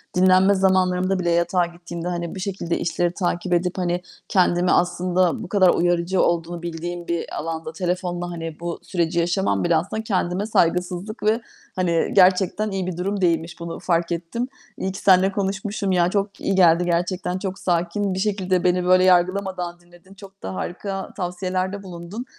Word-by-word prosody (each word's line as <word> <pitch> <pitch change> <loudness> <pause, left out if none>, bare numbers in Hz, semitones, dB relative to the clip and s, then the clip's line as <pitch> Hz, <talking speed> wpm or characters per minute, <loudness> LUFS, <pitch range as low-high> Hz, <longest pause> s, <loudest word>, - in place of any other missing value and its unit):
dinlenme 185 +2 +5
zamanlarımda 185 0 +2
bile 175 -1 0
yatağa 170 +1 +2
gittiğimde, 170 0 -7
hani, 170 0 -3
bir - - -6
şekilde 185 -3 -2
işleri 175 +1 0
takip 175 -1 -1
edip, 180 +2 0
hani, 175 -1 -1 0.3
kendimi 180 -1 +3
aslında 180 0 +1
bu - - -8
kadar 190 -3 +5
uyarıcı 175 +2 +2
olduğunu 170 0 0
bildiğim 175 +1 -5
bir 170 -1 -3
alanda 160 0 -4
telefonla, 175 0 -2
hani, 165 -2 -6
bu 170 0 -4
süreci 170 -2 -1
yaşamam 170 - +1
bile 170 - +3
aslında 200 +7 -1
kendime 190 -1 -1
saygısızlık 180 +2 0
ve 220 +2 +2 0.3
hani 170 -3 +1
gerçekten 190 +2 +3
iyi 190 -2 -2
bir 175 -2 -4
durum 195 +2 -2
değilmiş, 165 -1 0
bunu 170 0 -6
fark 175 -1 0
ettim. 175 +9 -3 0.3
İyi 190 - -2
ki 195 - -7
seninle 190 0 +5
konuşmuşum. 200 +1 -2
Ya, 175 -1 +3
çok 200 0 -2
iyi 195 - 0
geldi 175 -1 +5
gerçekten, 180 +1 -1
çok 190 -1 -5
sakin 180 +3 0
bir 190 - -3
şekilde 190 -3 0
beni 180 0 +2
böyle 185 0 +5
yargılamadan 180 -1 +1
dinledin. 175 +2 -19
Çok 195 0 -15
da 95 - -4
harika 195 - -5
tavsiyelerde 185 +2 -2
bulundun. 180 +6 -7
180 Hz, 165 wpm, -22 LUFS, 175-190 Hz, 0.3 s, dinlenme